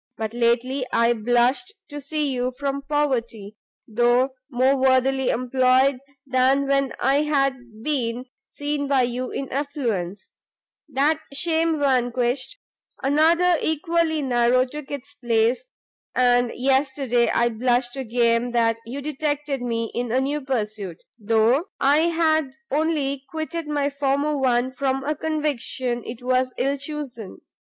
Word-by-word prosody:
But 220 0 -4
lately 240 +3 +1
I 235 +1 +3
blushed 245 - +1
to 290 -1 -7
see 295 0 -1
you 250 0 -1
from 280 0 -2
poverty, 235 -8 -1 0.3
though 240 +3 +2 0.2
more 260 +1 +3
worthily 265 0 +2
employed 255 +1 +2 0.3
than 265 +1 +2
when 275 -1 +1
I 270 +2 +3
had 265 -7 -1
been 250 -4 -1 0.2
seen 290 0 -3
by 275 -2 +3
you 250 +1 -2
in 275 - -4
affluence; 235 - -3 0.6
that 295 +3 +2
shame 325 +1 +1
vanquished, 255 - 0 0.5
another 330 +5 +4
equally 315 -1 0
narrow 250 0 +3
took 295 +2 -9
its 280 -2 -7
place, 230 - +1 0.5
and 245 -1 +3
yesterday 265 -2 +1
I 235 0 +2
blushed 245 +2 0
again 240 -1 +1
that 230 -1 +2
you 270 +4 -5
detected 290 -2 -2
me 230 -2 -2
in 240 -1 -2
a 255 - +2
new 285 +3 -1
pursuit, 215 - -3 0.2
though 225 - +2
I 280 +2 +4
had 315 -4 +1 0.2
only 285 -2 0
quitted 320 -1 -4
my 290 -1 0
former 280 +2 0
one 255 -2 +1
from 265 0 -1
a 300 +2 0
conviction 280 -6 -2
it 240 +1 -8
was 255 0 +1
ill 275 +3 0
chosen. 275 -8 -6
265 Hz, 130 wpm, -23 LUFS, 240-285 Hz, 0.6 s, another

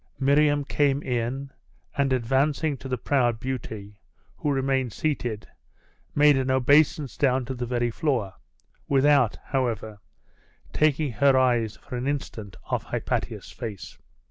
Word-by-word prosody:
Miriam 145 +1 +3
came 140 0 +1
in, 125 +2 -2 0.4
and 140 -1 +1
advancing 135 +5 +1
to 135 - -9
the 130 -1 -2
proud 120 -2 +1
beauty, 110 -5 -6 0.4
who 145 - -1
remained 135 -3 0
seated, 120 -8 -2 0.7
made 145 0 +6
an 130 0 0
obeisance 140 0 +3
down 130 -2 +1
to 130 - -4
the 125 -1 -4
very 120 -1 0
floor, 120 - -1 0.5
without, 140 -4 +3
however, 115 -5 -2 0.7
taking 150 -2 +2
her 135 +4 +4
eyes 120 -4 +2
for 125 -3 -8
an 125 +2 -3
instant 110 -9 -4
off - - -2
Hypatia's - - -3
face. 110 -6 -8
130 Hz, 130 wpm, -25 LUFS, 120-140 Hz, 0.7 s, made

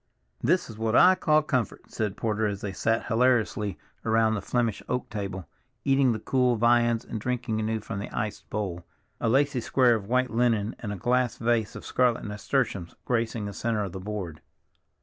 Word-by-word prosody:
"This 180 +2 +2
is 110 -2 -10
what 110 0 0
I 185 +1 +8
call 155 -4 +3
comfort," 130 -5 -2
said 105 -3 -2
Porter 110 -1 0
as 100 -1 -4
they 100 -2 -4
sat 115 +4 0
hilariously 115 -5 +1 0.3
around 110 0 +3
the 105 - -2
Flemish 115 0 -1
oak 125 - -1
table, 100 -3 -5 0.4
eating 135 -2 +4
the 110 - -1
cool 125 +2 +2
viands 120 0 +3
and 110 - -5
drinking 125 -2 -2
anew 110 0 -1
from 100 - -5
the 100 - -5
iced 105 -1 -4
bowl, 95 -5 -3 0.4
a 115 - 0
lacy 135 +1 +2
square 125 0 +4
of 105 -4 -2
white 130 +1 +2
linen 115 -2 +1
and 105 - -5
a - - -3
glass 125 +4 +1
vase 115 -2 0
of - - -8
scarlet 125 -2 +1
nasturtiums 105 -3 -2
gracing 115 -3 -1
the 100 - -5
center 110 -1 -1
of 100 - -4
the 95 - -6
board. 95 -6 -5
115 Hz, 190 wpm, -27 LUFS, 105-125 Hz, 0.4 s, I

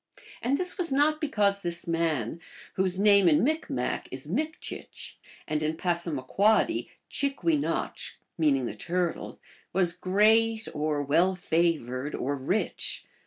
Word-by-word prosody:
And 270 +3 +1
this 365 +1 -3
was 340 -5 -1
not 300 +3 +3
because 205 -9 +1
this 170 -1 -4
man, 165 - -1 0.3
whose 185 -1 0
name 200 -2 +6
in 150 - +4
Micmac 315 +4 -1
is - - -7
Mikchieh 315 +1 -5 0.3
and 155 0 -1
in 155 +1 -1
Passamaquodcly 175 - +1 0.2
Chick 280 0 -1
we 330 -2 +4
notchk, 285 - -2 0.2
meaning 140 -6 +2
the 115 - -3
Turtle, 175 - -3 0.3
was 175 -2 +2
great, 220 +5 +3
or 150 -1 -1
well 170 +7 +3
favored, 155 -6 0
or 140 +3 -1
rich. 145 +11 -2
180 Hz, 130 wpm, -28 LUFS, 155-225 Hz, 0.3 s, name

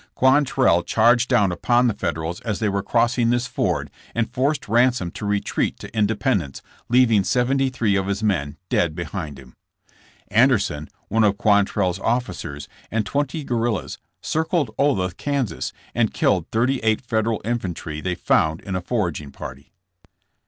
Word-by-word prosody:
Quantrell 130 - +3
cha:rged 120 +6 +3
down 105 -7 +3
upon 120 +7 +2
the 120 - +2
Federals 80 -3 -3
as 105 -3 -2
they 110 - 0
were 100 0 0
crossing 120 +2 +2
this 120 +1 +1
ford - - -1 0.2
and 115 -1 -1
forced 140 +3 0
Ransom 120 -4 +2
to 105 - -6
retreat 100 0 -1
to - - -11
Independence, 105 - 0 0.3
leaving 115 -4 +4
seventy 130 +5 +1
three 115 -5 0
of 95 -1 0
his 100 +2 -2
men 85 -8 0
dead 85 -3 +1
behind 80 -3 -5
him. 65 -2 -14 0.8
Anderson, 105 - +2 0.2
one 110 +1 +2
of 105 -1 +3
QuantrelPs 100 -3 +2
officers, 115 - -2 0.2
and 110 -1 -1
twenty 145 - -2
guerrillas, 120 -5 -2 0.2
circled 160 -6 0
Olathe, 95 - +1
Kas., 135 - -2 0.2
and - - 0
killed - - +2
thirty 125 +4 +1
eight 110 -1 +1
Federal 110 -2 0
infantry 90 -9 -3
they 90 +1 -2
found 80 -1 +1
in 95 - -5
a 95 - -1
foraging 85 - -2
party. - - -9
110 Hz, 150 wpm, -22 LUFS, 90-125 Hz, 0.8 s, leaving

